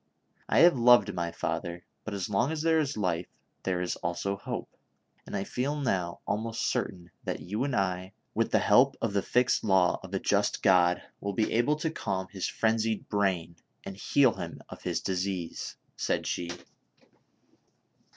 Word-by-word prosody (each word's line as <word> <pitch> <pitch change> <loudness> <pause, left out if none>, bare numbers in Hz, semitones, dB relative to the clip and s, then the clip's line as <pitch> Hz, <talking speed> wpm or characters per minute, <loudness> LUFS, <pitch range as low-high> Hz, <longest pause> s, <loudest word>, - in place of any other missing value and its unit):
I - - +5
have 175 -3 +7
loved 120 -3 +6
my 85 -1 -2
father; 85 +1 -3 0.2
but 110 - -4
as 95 -2 -2
long 105 +8 +1
as 160 -1 -2
there 165 -1 +4
is 145 -5 -1
life 90 -4 0 0.3
there 90 -2 -1
is 90 - -2
also 85 +3 -2
hope, 100 - -6 0.5
and - - -3
I 95 - -1
feel 130 +7 -2
now 90 -10 -1
almost 115 +2 -2
certain 90 -3 -2
that - - -3
you 105 +7 -2
and 140 -2 -1
I, 95 -1 -1 0.2
with - - 0
tlie - - +4
help 135 +1 +5
of 110 -3 -1
the 100 - +2
fixed 125 +4 +2
law 95 -4 +3
of 95 - -10
a - - +1
just 100 +1 +1
God, 90 -3 +4 0.2
will 100 0 -3
be 110 +2 0
able 120 +6 +3
to 155 +1 -2
calm 95 -10 -3
his 95 -3 -2
frenzied 110 -1 0
brain 95 -5 0 0.3
and 95 - -7
heal 130 +4 +3
him - - -7
of - - -10
his - - -1
disease! 95 -2 -3
" - - -41
said - - 0
she. 85 - -2
100 Hz, 180 wpm, -29 LUFS, 90-115 Hz, 0.5 s, have